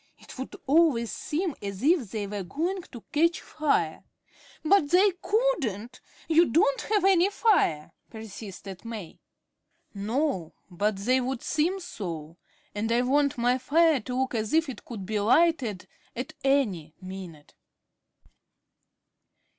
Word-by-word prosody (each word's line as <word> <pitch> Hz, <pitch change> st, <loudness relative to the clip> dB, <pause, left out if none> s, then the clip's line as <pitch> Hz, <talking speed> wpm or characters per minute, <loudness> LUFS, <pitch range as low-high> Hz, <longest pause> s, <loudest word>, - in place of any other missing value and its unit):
It -, -, -13 dB
would 260 Hz, -, -6 dB
always 280 Hz, -6 st, +3 dB
seem 330 Hz, +2 st, -2 dB
as 200 Hz, +1 st, -6 dB
if 300 Hz, -, +3 dB
they 210 Hz, 0 st, -3 dB
were 200 Hz, 0 st, -4 dB
going 340 Hz, -, -2 dB
to 240 Hz, -, -10 dB
catch 335 Hz, +3 st, +2 dB
fire." 310 Hz, -1 st, -1 dB, 0.6 s
"But 310 Hz, -3 st, +4 dB
they 380 Hz, +4 st, +5 dB
couldn't. 260 Hz, -, -1 dB, 0.3 s
You 330 Hz, +1 st, +5 dB
don't 280 Hz, 0 st, +2 dB
have 420 Hz, -3 st, +1 dB
any 380 Hz, -1 st, +5 dB
fire," 385 Hz, -, +2 dB, 0.2 s
persisted 200 Hz, -4 st, -9 dB
May. 220 Hz, -7 st, -8 dB, 0.7 s
"No, 210 Hz, -, -1 dB, 0.2 s
but 205 Hz, +4 st, 0 dB
they 250 Hz, +7 st, +1 dB
would 255 Hz, 0 st, -3 dB
seem 345 Hz, +6 st, 0 dB
so. 170 Hz, -, -7 dB, 0.4 s
And 220 Hz, +2 st, -2 dB
I 240 Hz, +1 st, +3 dB
want 280 Hz, +2 st, +2 dB
my 245 Hz, +2 st, +2 dB
fire 315 Hz, +3 st, +3 dB
to 250 Hz, +2 st, -5 dB
look 265 Hz, -, -2 dB
as 220 Hz, +1 st, -2 dB
if 320 Hz, -2 st, +3 dB
it 260 Hz, -, -8 dB
could 215 Hz, -6 st, -7 dB
be 215 Hz, +2 st, -1 dB
lighted 230 Hz, -, +2 dB, 0.3 s
at 255 Hz, +6 st, -5 dB
any 205 Hz, -, +1 dB
minute." 185 Hz, -5 st, -9 dB
250 Hz, 135 wpm, -27 LUFS, 205-320 Hz, 0.7 s, they